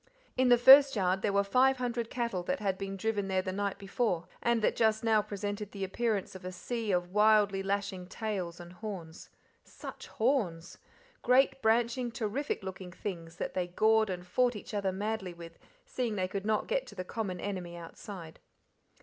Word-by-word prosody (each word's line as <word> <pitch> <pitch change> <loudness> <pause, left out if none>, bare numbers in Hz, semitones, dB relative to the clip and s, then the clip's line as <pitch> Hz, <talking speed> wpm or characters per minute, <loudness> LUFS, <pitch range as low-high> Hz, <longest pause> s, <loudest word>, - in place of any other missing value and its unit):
In 255 0 +3
the 245 - +7
first 270 +2 +9
yard 190 -1 +1
there 205 - +1
were 200 0 +3
five 260 +6 +3
hundred 240 -2 -2
cattle 235 -7 -2
that 275 - -1
had 195 -3 0
been 195 0 -5
driven 205 -1 -1
there 190 -1 0
the 185 - -3
night 200 0 -2
before, 195 -3 -1
and 235 -2 +1
that - - +2
just 220 -1 +2
now 220 -2 +4
presented 205 0 -5
the 195 -1 -4
appearance 210 +1 -1
of 190 -1 -10
a 185 - -5
sea 225 +4 -3
of 175 -1 0
wildly 210 -1 +4
lashing 195 -2 -2
tails 185 -5 -4
and 175 0 -10
horns. 180 -5 -8 0.3
Such - - -10
horns! 210 -9 -1 0.4
great, 265 +2 +3
branching, 235 +2 +2
terrific 230 +3 -2
looking 185 -1 -7
things 170 -3 -6
that - - -4
they 180 -1 -1
gored 220 +4 +3
and 180 -1 -4
fought 245 +6 +2
each 210 - -8
other 200 -2 0
madly 200 -2 -3
with, 170 -1 -11 0.3
seeing 240 -4 -2
they 185 -2 0
could 195 +2 -4
not 215 -1 +1
get - - -1
to - - -11
the 185 -1 -5
common 190 -3 -4
enemy 180 -3 -5
outside. 170 0 -9
205 Hz, 185 wpm, -31 LUFS, 185-225 Hz, 0.4 s, first